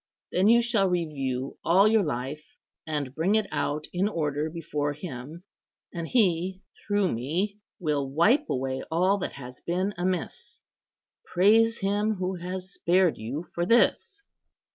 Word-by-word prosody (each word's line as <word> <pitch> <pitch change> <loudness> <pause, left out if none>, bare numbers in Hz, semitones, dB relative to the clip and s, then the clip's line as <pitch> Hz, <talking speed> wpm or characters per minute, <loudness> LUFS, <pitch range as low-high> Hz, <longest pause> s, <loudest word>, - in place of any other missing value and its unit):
Then 185 +3 +3
you 235 +2 +6
shall 220 -5 +2
review 140 -7 -2
all 190 +5 +5
your 220 0 +4
life, 145 -1 -5 0.3
and 145 -4 -3
bring 170 +8 +1
it 220 -1 +2
out 145 +1 -2
in 185 +3 +1
order 150 -5 -1
before 150 -3 -3
Him; 150 +1 -8 0.5
and 170 -1 -4
He, 185 -4 +1 0.2
through 205 -3 +2
me, 175 - -2 0.2
will 150 -6 -1
wipe 215 - +3
away 130 0 -2
all 185 +5 +2
that - - -4
has 125 -2 -10
been 185 +4 -1
amiss. 180 -1 -3 0.7
Praise 225 +5 +4
Him 205 +2 +1
who 185 0 -2
has 185 +2 -6
spared 180 -1 +2
you 130 +10 -5
for 175 - -1
this." 320 - +2
175 Hz, 140 wpm, -27 LUFS, 145-200 Hz, 0.7 s, you